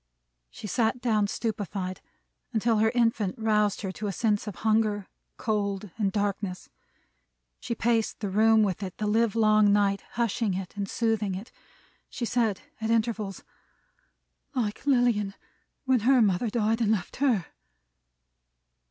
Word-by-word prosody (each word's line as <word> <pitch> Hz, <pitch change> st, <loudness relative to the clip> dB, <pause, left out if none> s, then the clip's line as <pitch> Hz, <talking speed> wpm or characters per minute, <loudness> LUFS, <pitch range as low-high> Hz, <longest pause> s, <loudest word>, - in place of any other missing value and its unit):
She -, -, -10 dB
sat 225 Hz, +4 st, 0 dB
down 215 Hz, -4 st, +1 dB
stupefied, 200 Hz, -4 st, -3 dB, 0.5 s
until 225 Hz, 0 st, +2 dB
her 220 Hz, +1 st, +4 dB
infant 230 Hz, -5 st, +1 dB
roused 210 Hz, -2 st, +1 dB
her 195 Hz, -3 st, -3 dB
to 210 Hz, +3 st, -5 dB
a -, -, -1 dB
sense 210 Hz, +2 st, 0 dB
of 205 Hz, -, -5 dB
hunger, 215 Hz, -2 st, +2 dB, 0.3 s
cold, 200 Hz, -3 st, -2 dB
and 205 Hz, -3 st, 0 dB
darkness. 200 Hz, -2 st, -2 dB, 0.9 s
She 235 Hz, -, -4 dB
paced 225 Hz, -1 st, 0 dB
the 205 Hz, -3 st, -3 dB
room 220 Hz, +2 st, +5 dB
with 195 Hz, -2 st, -1 dB
it 185 Hz, -3 st, -6 dB
the 215 Hz, -, -2 dB
livelong 215 Hz, -1 st, +3 dB
night, 200 Hz, -1 st, +2 dB
hushing 230 Hz, -3 st, 0 dB
it 190 Hz, 0 st, -6 dB
and 200 Hz, -1 st, -3 dB
soothing 220 Hz, -4 st, 0 dB
it. 200 Hz, +6 st, -8 dB, 0.6 s
She 240 Hz, -, -4 dB
said 225 Hz, -4 st, 0 dB, 0.2 s
at 220 Hz, -, -1 dB
intervals, 220 Hz, -3 st, -1 dB, 1.1 s
"Like 225 Hz, +1 st, -2 dB
Lilian 240 Hz, -7 st, +2 dB, 0.5 s
when 260 Hz, -1 st, +3 dB
her 255 Hz, +4 st, +4 dB
mother 210 Hz, +1 st, +2 dB
died 225 Hz, +1 st, 0 dB
and 215 Hz, -2 st, +3 dB
left 195 Hz, -5 st, -2 dB
her!" 245 Hz, -, +2 dB
215 Hz, 140 wpm, -27 LUFS, 200-230 Hz, 1.1 s, room